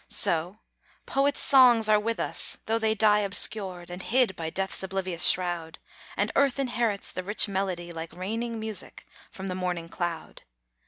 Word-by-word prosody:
So, 170 +4 +1 0.5
poets' 280 +1 0
songs 245 -5 +6
are 215 -1 +4
with 230 +2 -3
us, - - +1
tho' 225 +1 0
they 220 -1 0
die 210 -1 +4
Obscured, 190 -3 0
and 180 +1 -7
hid 235 -2 +1
by 160 -1 -5
death's 190 +3 -4
oblivious 185 -2 +2
shroud, 175 -3 0 0.4
And - - 0
Earth 280 -1 +2
inherits 240 -6 -2
the 185 - -5
rich 210 +4 +1
melody 185 -3 -3
Like 165 0 -7
raining 225 +5 -4
music 220 -2 -5 0.2
from 190 -3 -9
the 185 - -3
morning 180 -2 -4
cloud. 175 -2 -5
195 Hz, 160 wpm, -26 LUFS, 180-225 Hz, 0.5 s, songs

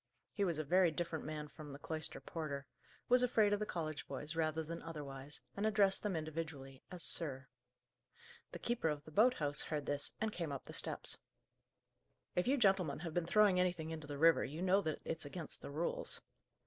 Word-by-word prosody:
He 205 - 0
was 170 -5 +1
a 155 - -1
very 180 +4 +5
different 160 0 -3
man 150 0 -4
from 150 0 -10
the 140 - -7
cloister 155 +1 -2
porter; 145 -4 -4 0.4
was 250 0 +5
afraid 220 -4 +4
of 205 - +1
the 210 - -2
college 155 -3 -3
boys, 145 +4 -5
rather 160 0 +1
than 165 +2 -6
otherwise, 145 -3 -7
and 200 - -2
addressed 205 -2 +4
them 205 -4 -1
individually 155 -4 -5
as 180 -2 -6
"sir." 135 -6 +2 1.1
The - - -5
keeper 240 -9 0
of 150 -1 -3
the 155 - -11
boat 240 +9 +5
house 145 -2 0
heard 150 -3 -2
this, 145 0 0
and 220 -1 -1
came 165 -4 -3
up 140 - -5
the - - -9
steps. - - +1 1.2
"If 180 - +1
you 275 +2 +4
gentlemen 195 - +3
have 165 -3 -4
been 175 -1 0
throwing 205 -1 +5
anything 175 -3 0
into 155 -2 -6
the 145 -1 -5
river 165 +2 +6
you 155 +6 -4
know 190 +2 +4
that 155 -4 -2
it's 160 -2 -2
against 165 +1 -5
the - - -7
rules." 155 +4 -3
160 Hz, 200 wpm, -37 LUFS, 150-185 Hz, 1.2 s, river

